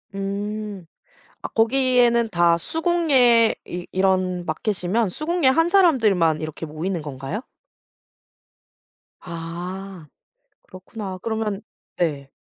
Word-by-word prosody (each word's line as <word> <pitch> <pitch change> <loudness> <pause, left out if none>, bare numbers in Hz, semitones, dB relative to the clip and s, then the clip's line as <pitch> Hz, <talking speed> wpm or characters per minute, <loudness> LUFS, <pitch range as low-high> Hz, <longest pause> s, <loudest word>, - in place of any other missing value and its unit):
음. 200 0 -4 0.6
아 - - -2
거기에는 240 -1 +3
다 170 -3 +3
수공예 270 - +3
이 175 0 -6
이런 185 -1 +1
마켓이면 190 +5 -1
수공예 310 - +1
한 325 +6 +3
사람들만 215 - +3
이렇게 155 +1 -5
모이는 165 +3 -3
건가요? 145 - -5 1.8
아. 175 +1 -7 0.6
그렇구나 190 +1 -8
그러면 220 -3 -2 0.3
네. 145 -5 -2
195 Hz, 210 characters per minute, -22 LUFS, 175-235 Hz, 1.8 s, 거기에는